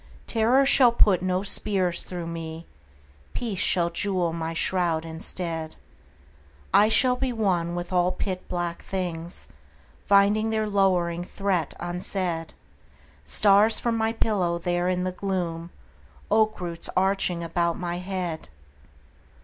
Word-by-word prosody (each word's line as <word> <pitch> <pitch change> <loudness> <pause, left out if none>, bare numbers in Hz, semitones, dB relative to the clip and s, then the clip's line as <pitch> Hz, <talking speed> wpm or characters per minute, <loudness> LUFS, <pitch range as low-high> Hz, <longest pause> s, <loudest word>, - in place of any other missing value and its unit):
Terror 240 +4 +3
shall 260 -3 +6
put 205 -6 +3
no 185 +1 -1
spears 190 -3 +2
through 175 -2 -6
me. 165 0 -7 0.7
Peace 220 -6 -3
shall 170 -1 +3
jewel 180 -1 -1
my 165 -1 -4
shroud 165 -1 0
instead. 165 0 -3 1.0
I 210 +1 +5
shall 250 +2 +4
be 260 0 -2
one 180 -7 -1
with 175 +1 -5
all 180 0 +2
pit 185 -1 -5
black 175 -1 -3
things 175 -3 -4 0.6
Finding 205 +2 +3
their 220 -1 0
lowering 180 -4 +1
threat 190 -2 -2
unsaid: 175 -1 -3 0.7
Stars 210 +2 +4
for 235 - -1
my 225 -1 0
pillow 200 -7 0
there 175 +1 -1
in 180 0 -1
the 185 - -2
gloom,— 175 -3 -4 0.6
Oak 215 0 +2
roots 170 -2 -4
arching 190 -2 +1
about 170 0 -1
my 175 0 -4
head! 180 - -5
180 Hz, 125 wpm, -25 LUFS, 170-200 Hz, 1.0 s, shall